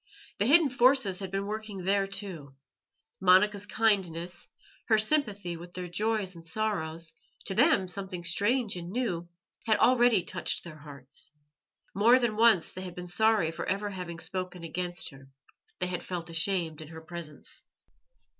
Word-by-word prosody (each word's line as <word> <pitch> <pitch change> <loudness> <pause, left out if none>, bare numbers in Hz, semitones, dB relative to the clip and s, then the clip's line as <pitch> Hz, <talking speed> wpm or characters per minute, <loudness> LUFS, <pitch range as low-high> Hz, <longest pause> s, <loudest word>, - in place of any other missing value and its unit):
The 205 - +2
hidden 300 0 +6
forces 250 -6 +4
had 195 -2 -5
been 195 +1 -2
working 210 -2 -5
there 195 +1 +2
too. 175 -9 -6 0.7
Monica's 195 +2 +4
kindness, 180 -6 0 0.4
her 220 - +5
sympathy 210 - +2
with 175 +1 -11
their 180 -1 -4
joys 205 +1 -1
and 165 -1 -12
sorrows 165 -4 -2 0.3
to 195 - -1
them 240 - +4
something 185 -1 -5
strange 205 +6 +1
and 175 -1 -6
new 185 -7 -2 0.4
had 220 -1 +4
already 240 -5 +4
touched - - -3
their 155 -3 -10
hearts. 140 -3 -7 0.6
More 225 +6 +6
than 240 -4 0
once 225 -5 +4
they 185 - -7
had 180 -2 -7
been 180 - -6
sorry 210 -2 +2
for 165 - -5
ever 205 +2 -1
having 180 -3 -6
spoken 180 +1 -4
against 175 +1 -3
her; 135 -1 -15 0.5
they 180 - 0
had 180 -1 -4
felt 175 -2 -5
ashamed 165 -2 0
in 155 - -9
her 160 +1 -10
presence. 160 -2 -7
185 Hz, 155 wpm, -29 LUFS, 170-215 Hz, 0.7 s, hidden